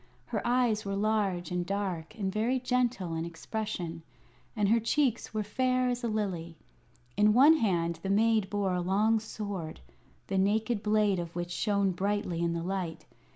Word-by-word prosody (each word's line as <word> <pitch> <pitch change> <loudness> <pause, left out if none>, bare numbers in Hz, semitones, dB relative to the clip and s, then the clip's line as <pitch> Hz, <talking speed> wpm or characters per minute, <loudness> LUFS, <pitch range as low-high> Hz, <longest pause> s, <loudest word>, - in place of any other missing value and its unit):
Her - - -2
eyes 240 -3 +2
were 195 0 -3
large 200 -4 0
and 180 0 0
dark 190 -2 -3
and 190 -3 -2
very 235 +5 +1
gentle 245 -8 0
in 165 0 -2
expression, 170 0 -4 0.5
and 210 -2 +2
her 230 +3 +4
cheeks 235 +1 0
were 215 -1 -1
fair 255 +4 +1
as 245 0 -2
a - - +1
lily. 185 -7 -3 0.6
In 210 0 +4
one 290 +7 +7
hand 170 - 0
the 195 - -4
maid 215 0 +3
bore 200 -2 0
a 180 - 0
long 210 +5 +2
sword, 200 -7 -6 0.5
the 195 -1 -1
naked 215 +3 +1
blade 210 -3 +2
of 170 -1 -6
which 175 0 -3
shone 200 +1 +1
brightly 190 -2 -1
in 170 0 +1
the 170 0 -3
light. 180 -3 -3
205 Hz, 170 wpm, -30 LUFS, 175-220 Hz, 0.6 s, one